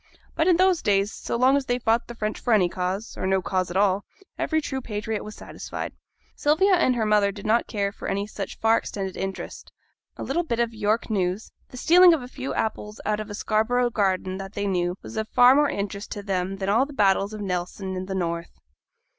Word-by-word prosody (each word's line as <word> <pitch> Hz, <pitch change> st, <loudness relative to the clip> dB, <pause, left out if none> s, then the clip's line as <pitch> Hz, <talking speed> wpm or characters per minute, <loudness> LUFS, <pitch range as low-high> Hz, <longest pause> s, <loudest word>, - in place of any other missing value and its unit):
But 320 Hz, -, +1 dB
in 355 Hz, -2 st, +5 dB
those 370 Hz, -2 st, +3 dB
days, 200 Hz, 0 st, +1 dB
so -, -, -4 dB
long 255 Hz, +3 st, +4 dB
as 280 Hz, -2 st, -1 dB
they 245 Hz, -, +1 dB
fought 230 Hz, -1 st, +1 dB
the 240 Hz, -, -8 dB
French 215 Hz, -1 st, -3 dB
for 240 Hz, -, +1 dB
any 190 Hz, -5 st, +4 dB
cause, 185 Hz, +4 st, -3 dB
or -, -, -8 dB
for 185 Hz, -, 0 dB
no 190 Hz, 0 st, +3 dB
cause 185 Hz, -1 st, -1 dB
at 175 Hz, -, -2 dB
all, 200 Hz, 0 st, +2 dB, 0.3 s
every 315 Hz, -, 0 dB
true 265 Hz, -3 st, -4 dB
patriot 215 Hz, -2 st, -4 dB
was 215 Hz, -, -8 dB
satisfied. -, -, -7 dB, 0.4 s
Sylvia 345 Hz, +7 st, +3 dB
and 295 Hz, -8 st, +3 dB
her 225 Hz, -2 st, 0 dB
mother 210 Hz, -1 st, +3 dB
did 200 Hz, 0 st, -10 dB
not 225 Hz, +2 st, +2 dB
care 200 Hz, -2 st, -1 dB
for -, -, -8 dB
any 200 Hz, +1 st, -1 dB
such 210 Hz, -, -6 dB
far 225 Hz, 0 st, +3 dB
extended 195 Hz, -2 st, -5 dB
interest; 195 Hz, 0 st, -6 dB, 0.5 s
a -, -, -5 dB
little 345 Hz, -, 0 dB
bit 240 Hz, -9 st, -2 dB
of 235 Hz, -1 st, 0 dB
York 220 Hz, +1 st, 0 dB
news, 190 Hz, 0 st, -1 dB, 0.2 s
the 250 Hz, -, -10 dB
stealing 350 Hz, +5 st, +7 dB
of 285 Hz, -, -6 dB
a -, -, -7 dB
few 260 Hz, +1 st, -6 dB
apples 210 Hz, -1 st, -3 dB
out 210 Hz, 0 st, 0 dB
of 215 Hz, 0 st, -6 dB
a 205 Hz, -, -5 dB
Scarborough 240 Hz, +4 st, +1 dB
garden 190 Hz, -3 st, 0 dB
that 195 Hz, +1 st, -7 dB
they 205 Hz, -, -2 dB
knew, 180 Hz, -2 st, 0 dB
was -, -, -8 dB
of 220 Hz, 0 st, -2 dB
far 245 Hz, +1 st, +7 dB
more 290 Hz, +1 st, +4 dB
interest 200 Hz, +1 st, -4 dB
to 205 Hz, -, -7 dB
them 190 Hz, -1 st, -1 dB
than 190 Hz, 0 st, -3 dB
all 230 Hz, +7 st, +3 dB
the 290 Hz, -, -10 dB
battles 200 Hz, -3 st, +2 dB
of 215 Hz, -1 st, -6 dB
Nelson 190 Hz, 0 st, -3 dB
and 185 Hz, 0 st, -4 dB
the 190 Hz, -, -3 dB
North. 170 Hz, -2 st, -3 dB
210 Hz, 230 wpm, -25 LUFS, 195-245 Hz, 0.5 s, stealing